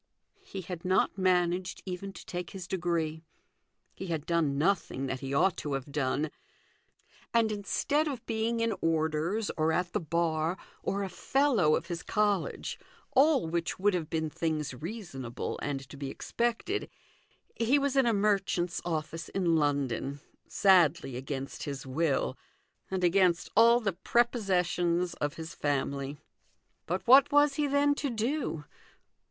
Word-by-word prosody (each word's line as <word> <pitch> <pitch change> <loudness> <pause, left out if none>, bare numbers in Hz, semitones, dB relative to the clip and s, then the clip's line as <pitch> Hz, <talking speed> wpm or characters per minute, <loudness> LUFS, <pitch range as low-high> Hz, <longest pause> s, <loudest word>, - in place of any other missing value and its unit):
He 195 - -7
had 175 -1 -7
not 185 +1 +2
managed 180 -1 +1
even 190 +1 -5
to - - -11
take 180 -1 -5
his 185 -2 -8
degree; 165 -4 -1 0.7
he 190 - -7
had 160 -3 -2
done 160 -5 +1
nothing 160 -5 0
that 130 -1 -3
he 135 0 -5
ought 165 +6 +3
to 145 - -3
have 135 +1 -4
done: 145 +1 0 1.0
and, 225 -2 +4
instead 280 +9 0
of 265 -6 -5
being 225 +1 -1
in 230 -1 +1
orders 165 +6 0
or 155 0 +2
at 175 +1 -1
the 210 - +1
bar, 165 0 0 0.2
or 200 +1 -1
a - - -2
fellow 225 - +2
of 165 - -2
his 170 -2 -4
college, 205 -5 -1 0.3
all 280 - +4
which 170 +1 -2
would 205 +2 +2
have 165 -3 -2
been 160 -1 -1
things 155 -3 -2
reasonable 135 - -5
and 135 -2 -3
to - - -11
be 140 -1 -4
expected, 240 - -2 0.7
he 235 +5 +3
was 280 -1 0
in 265 -3 +4
a - - +4
merchant's 195 -4 +1
office 165 -1 -3
in 175 -4 +1
London, 140 -2 0 0.3
sadly 170 -8 +4
against 135 +1 -5
his 140 -2 -5
will, 135 - 0 0.5
and 190 -1 -2
against 180 -1 +3
all 235 +1 +7
the 205 -5 -1
prepossessions 180 -6 +1
of 145 0 -1
his 165 +2 -7
family. 140 -1 -2 0.7
But 180 +3 -2
what 270 +4 +7
was 290 0 +5
he, 290 +1 0
then, 285 +1 +3
to 285 -1 -2
do 235 - -2
175 Hz, 150 wpm, -30 LUFS, 155-210 Hz, 1.0 s, all